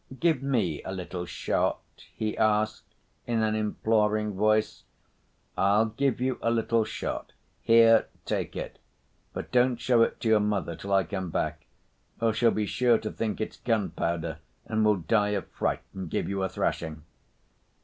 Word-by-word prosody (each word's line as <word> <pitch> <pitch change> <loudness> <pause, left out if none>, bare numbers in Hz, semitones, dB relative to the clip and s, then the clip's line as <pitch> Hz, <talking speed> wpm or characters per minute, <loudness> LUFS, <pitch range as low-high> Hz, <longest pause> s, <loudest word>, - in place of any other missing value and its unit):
"Give 165 -6 +2
me 110 - 0
a - - -6
little 90 -1 -5
shot," - - 0 0.4
he 110 -1 -2
asked 110 0 0 0.3
in 115 -2 +1
an 110 0 +1
imploring 105 0 +1
voice. 110 +2 +1 0.7
"I'll 100 +3 +3
give 130 +3 0
you 130 0 -1
a 115 - +1
little 115 0 +2
shot; - - -5 0.3
here, 115 0 +6 0.2
take - - -2
it, - - -6 0.5
but - - -6
don't 125 0 +3
show 120 -1 +3
it - - +1
to - - -1
your 110 -1 +5
mother 100 -5 -1
till 100 +5 -7
I 95 -1 +4
come 95 +1 -4
back, 80 -1 -3 0.5
or 115 -1 +2
she'll 115 +2 +3
be 110 -1 0
sure 120 +2 +3
to 110 - -5
think 110 -2 -3
it's 110 - -4
gunpowder, 95 -7 -1 0.3
and 110 0 0
will 105 -1 +4
die 105 +5 +1
of 95 - -5
fright - - -2
and 95 -1 -6
give - - -1
you 100 0 -2
a 95 - 0
thrashing." 80 -3 -2
110 Hz, 165 wpm, -27 LUFS, 95-115 Hz, 0.7 s, here